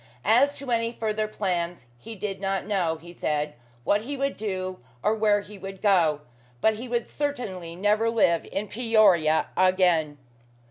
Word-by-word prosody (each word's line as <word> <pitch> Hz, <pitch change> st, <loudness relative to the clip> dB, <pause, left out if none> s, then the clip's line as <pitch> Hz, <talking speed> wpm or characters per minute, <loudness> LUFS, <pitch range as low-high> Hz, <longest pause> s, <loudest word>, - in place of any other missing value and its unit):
As 255 Hz, +7 st, +4 dB
to 275 Hz, -2 st, -6 dB
any 230 Hz, 0 st, +1 dB
further 215 Hz, -2 st, -1 dB
plans, 180 Hz, -7 st, -2 dB
he 225 Hz, -, -9 dB
did 195 Hz, -1 st, -5 dB
not 195 Hz, -1 st, -1 dB
know, 180 Hz, -6 st, 0 dB
he 170 Hz, +2 st, -13 dB
said, 150 Hz, -3 st, -1 dB, 0.3 s
what 205 Hz, +10 st, +2 dB
he 280 Hz, +5 st, -5 dB
would 275 Hz, +1 st, -1 dB
do, 185 Hz, -3 st, -4 dB, 0.2 s
or 215 Hz, -, +3 dB
where 210 Hz, -2 st, +2 dB
he 205 Hz, 0 st, -12 dB
would 195 Hz, 0 st, -8 dB
go; 170 Hz, -8 st, +3 dB, 0.4 s
but 220 Hz, -, +3 dB
he 245 Hz, +3 st, -6 dB
would 235 Hz, -1 st, -1 dB
certainly 210 Hz, -, -4 dB
never 210 Hz, +4 st, +2 dB
live 180 Hz, -7 st, +2 dB
in 205 Hz, +2 st, -2 dB
Peoria 200 Hz, -9 st, +3 dB
again. 180 Hz, -5 st, +3 dB
200 Hz, 160 wpm, -26 LUFS, 175-220 Hz, 0.4 s, As